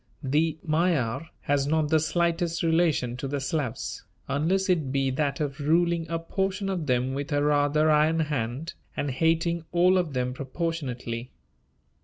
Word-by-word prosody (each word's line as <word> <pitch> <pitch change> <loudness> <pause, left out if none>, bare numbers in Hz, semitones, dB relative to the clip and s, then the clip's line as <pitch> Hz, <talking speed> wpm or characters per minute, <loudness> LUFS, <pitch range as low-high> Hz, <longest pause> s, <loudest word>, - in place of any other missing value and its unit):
The 150 +4 +1
Magyar 160 -3 +1
has 140 -1 +1
not 155 0 +1
the 160 0 +4
slightest 170 +1 0
relation 160 -7 +2
to 135 - -4
the 140 +1 -2
Slavs, 135 -3 -3 0.2
unless 180 +7 +1
it 160 -8 +1
be 135 -1 +1
that 140 +1 -1
of 145 -2 -3
ruling 165 +2 +2
a 165 - 0
portion 195 +4 -2
of 175 -5 -2
them 125 0 +1
with 140 +3 -4
a 145 0 +2
rather 150 +1 +3
iron 155 +2 +3
hand, 145 +1 -2 0.2
and 145 - -1
hating 165 +4 +1
all 180 +2 +4
of 165 -5 -2
them 125 0 -1
proportionately. 130 -4 -4
155 Hz, 155 wpm, -27 LUFS, 135-165 Hz, 0.2 s, the